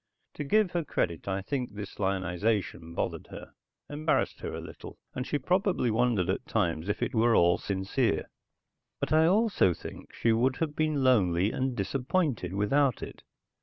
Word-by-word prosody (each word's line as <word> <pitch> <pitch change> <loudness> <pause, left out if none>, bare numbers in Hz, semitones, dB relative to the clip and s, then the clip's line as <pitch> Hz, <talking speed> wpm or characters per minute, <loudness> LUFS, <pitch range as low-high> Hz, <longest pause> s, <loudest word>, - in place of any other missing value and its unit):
To 150 - -4
give 210 +5 +2
her 170 -1 -1
credit, 85 - -2
I 95 0 -1
think 125 -3 -3
this 100 -1 -8
lionization 95 -2 -1
bothered - - -3
her, - - -10 0.3
embarrassed 150 +2 0
her - - -5
a - - -4
little, - - -10 0.2
and 125 - -4
she 145 - 0
probably 180 - +1
wondered 110 -5 +2
at 95 - -2
times 85 -4 0
if 105 - -1
it - - -2
were 115 0 +4
all 85 +1 +4
sincere. 100 - -1 0.7
But - - -1
I 160 +1 +5
also 195 - +3
think - - -10
she 115 - +1
would 125 +4 +2
have 150 -1 -2
been 155 -3 +1
lonely 100 -6 +3
and 130 -1 -1
disappointed 125 - -1
without 130 +5 +2
it. - - -9
115 Hz, 165 wpm, -29 LUFS, 95-145 Hz, 0.7 s, I